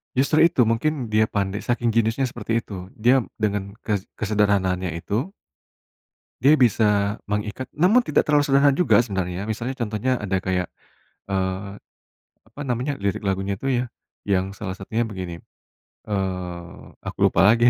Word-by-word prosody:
Justru 140 +4 +3
itu, 135 - +1
mungkin 125 -1 -1
dia 110 0 +3
pandai, 100 -1 -2
saking 120 -1 0
jeniusnya 115 +3 +2
seperti 115 0 -2
itu, 95 -3 -8
dia 125 +3 +4 0.2
dengan 100 -2 -2
ke 105 -3 0 0.2
kesederhanaannya 95 -4 +1
itu. 110 - -2 1.2
Dia 150 +3 +6
bisa 105 -4 +3 0.2
mengikat 105 +5 -3
namun 195 +11 +4
tidak - - +1
terlalu 150 -1 +4
sederhana 140 0 +4
juga 180 -7 +4
sebenarnya, 95 -3 -2
misalnya 115 +3 -2
contohnya 120 +3 -1
ada 95 -2 -1
kayak, 90 -1 0 0.6
eee, 95 +1 -2 0.7
apa 115 +6 -11
namanya 125 +3 -2
lirik 100 0 -2
lagunya 95 0 -1
itu 135 - -5 0.2
ya, - - -5 0.4
yang 95 -1 +1
salah 100 -2 -6
satunya 110 +4 -2
begini, 90 -5 -6 0.6
eee, 90 -4 -4
aku - - -7
lupa 95 - +5
lagi, 115 +3 +6
105 Hz, 140 wpm, -23 LUFS, 95-120 Hz, 1.2 s, Dia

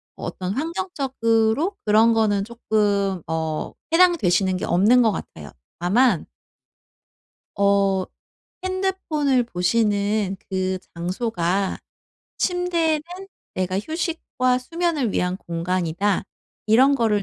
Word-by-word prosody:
어떤 185 +1 -4
환경적으로 280 - 0
그런 220 +2 +5
거는 210 -3 +2
쪼끔 205 -5 0
어 160 -1 -2 0.2
해당되시는 195 - +3
게 - - -3
없는 210 +8 +4
것 225 -3 +4
같아요. 75 - -8 0.3
다만 200 +1 +2 1.3
어 200 -2 +3 0.6
핸드폰을 370 -9 0
보시는 205 0 0
그 185 0 -1 0.2
장소가 185 +1 -1 0.6
침대는 340 -4 +1 0.5
'내가 185 0 -1
휴식과 295 - -1
수면을 310 - -1
위한 180 +1 0
공간이다.' 175 +3 -1 0.4
이런 260 +6 +5
거를 220 -5 +1
215 Hz, 215 characters per minute, -22 LUFS, 185-275 Hz, 1.3 s, 그런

